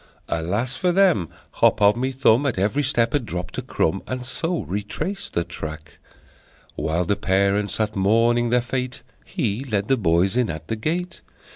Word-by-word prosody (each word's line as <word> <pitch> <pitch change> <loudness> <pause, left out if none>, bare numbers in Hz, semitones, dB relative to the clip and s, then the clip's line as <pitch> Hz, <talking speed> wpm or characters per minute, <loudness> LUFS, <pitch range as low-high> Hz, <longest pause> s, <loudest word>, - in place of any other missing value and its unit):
Alas 100 +11 -1
for 180 +5 +1
them! 175 - +3 0.3
Hop - - +4
O' 100 0 +6
My 125 +4 -1
Thumb 130 0 +3
At 125 - -1
every 105 +9 +1
step 120 -4 +1
had 145 -3 +1
dropped 90 -3 -5
a - - -2
crumb, 95 +4 -1
And 130 -1 -4
so 165 +6 -2
retraced 105 - -4
the 85 - +1
track. 80 -3 -8 0.8
While 85 +3 -1
the 100 - +1
parents 100 +1 +1
sat 110 -1 -1
mourning 115 +4 +3
their 125 +1 +3
fate 130 +1 -4 0.2
He 135 - -2
led 105 -6 -2
the 135 - +4
boys 95 0 +2
in 125 -3 +2
at 80 0 -6
the 110 - 0
gate! 170 +10 -3
110 Hz, 175 wpm, -23 LUFS, 95-130 Hz, 0.8 s, O